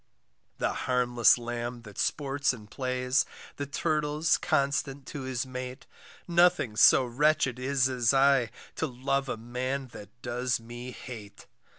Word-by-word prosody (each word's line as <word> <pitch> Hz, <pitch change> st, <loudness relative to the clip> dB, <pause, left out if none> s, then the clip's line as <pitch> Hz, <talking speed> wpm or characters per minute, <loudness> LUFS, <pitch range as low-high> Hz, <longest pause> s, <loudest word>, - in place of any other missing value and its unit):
The -, -, 0 dB, 0.2 s
harmless 120 Hz, -2 st, +4 dB
lamb 120 Hz, 0 st, -5 dB
that 105 Hz, -3 st, -11 dB
sports 140 Hz, -1 st, 0 dB
and 105 Hz, -3 st, -12 dB
plays, 130 Hz, 0 st, +1 dB, 0.3 s
The 140 Hz, -, -4 dB
turtle's 150 Hz, +2 st, +1 dB
constant 140 Hz, -3 st, 0 dB
to 145 Hz, -, -6 dB
his 130 Hz, -1 st, -2 dB
mate, 130 Hz, 0 st, -7 dB, 0.4 s
Nothing 175 Hz, -10 st, +3 dB
so 125 Hz, +4 st, +7 dB
wretched 135 Hz, 0 st, +1 dB
is 130 Hz, 0 st, +2 dB
as 125 Hz, -3 st, +2 dB
I, 135 Hz, -3 st, +4 dB, 0.3 s
To -, -, 0 dB
love 135 Hz, +2 st, -1 dB
a -, -, -2 dB
man 130 Hz, +3 st, -3 dB
that 105 Hz, -4 st, -11 dB
does 125 Hz, +1 st, -1 dB
me 120 Hz, +2 st, -8 dB
hate. 115 Hz, -5 st, -10 dB
130 Hz, 135 wpm, -28 LUFS, 120-140 Hz, 0.4 s, so